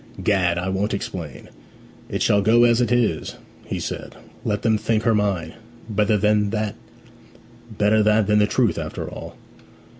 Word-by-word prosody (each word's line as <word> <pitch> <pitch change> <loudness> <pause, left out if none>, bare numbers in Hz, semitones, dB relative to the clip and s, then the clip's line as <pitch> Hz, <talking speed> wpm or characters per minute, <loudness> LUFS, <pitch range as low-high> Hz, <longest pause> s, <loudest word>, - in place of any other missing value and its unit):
'Gad, 90 -4 +2
I 90 +1 -2
won't 95 +2 -1
explain; 85 -7 -7 0.6
it - - -1
shall 100 - +3
go 115 +4 +4
as 120 0 +4
it 120 - 0
is!' 120 -2 0 0.3
he - - -4
said. - - -6 0.3
'Let 105 -1 -2
them 110 -2 +2
think 110 0 0
her 115 -1 +3
mine. 100 -6 -1 0.3
Better 105 -1 +1
that 105 +1 +1 1.0
than 105 0 +3
the 105 - +3
truth, - - +1
after - - -5
all.' - - -9
105 Hz, 145 wpm, -22 LUFS, 100-110 Hz, 1.0 s, go